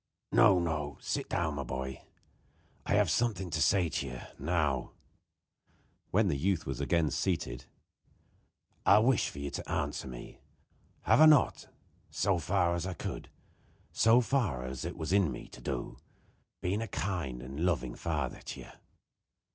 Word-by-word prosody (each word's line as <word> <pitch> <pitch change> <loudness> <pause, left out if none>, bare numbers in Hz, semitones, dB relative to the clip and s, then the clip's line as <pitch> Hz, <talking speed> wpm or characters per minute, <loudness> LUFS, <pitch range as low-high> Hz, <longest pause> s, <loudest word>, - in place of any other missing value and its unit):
"No, 100 -4 +6
no. 75 -4 -2
Sit - - -3
down, 80 -3 0
my 70 -1 -3
boy; 65 +1 -5 0.9
I 100 - +2
have 105 -5 +3
something 95 -3 0
to 80 - -1
say 90 +5 +4
to 70 -3 -3
you. 65 -1 -6 0.2
Now," 75 -4 0 1.2
when 105 +2 +3
the 80 - +1
youth 90 +4 0
was 65 -2 -4
again 80 -4 +1
seated, 85 -10 -2 1.2
"I - - +7
wish 115 - +2
you 70 0 -4
to - - -6
answer - - -2
me. - - -9 0.6
Have - - +4
I 155 - +10
not, 150 -3 +4 0.4
so 95 -2 +1
far 85 +2 +1
as 85 +1 -2
I 95 - -4
could, - - -6 0.6
so 115 +2 +5
far 110 - 0
as 65 +3 -5
it 85 - -5
was 80 +1 -2
in 100 -7 +3
me - - -7
to - - -12
do, 65 -3 -4 0.7
been 100 +4 0
a 115 - -3
kind 85 - -3
and 70 +5 -5
loving 85 -9 0
father 75 -6 -3
to - - -7
you?" - - -11
85 Hz, 155 wpm, -31 LUFS, 70-95 Hz, 1.2 s, I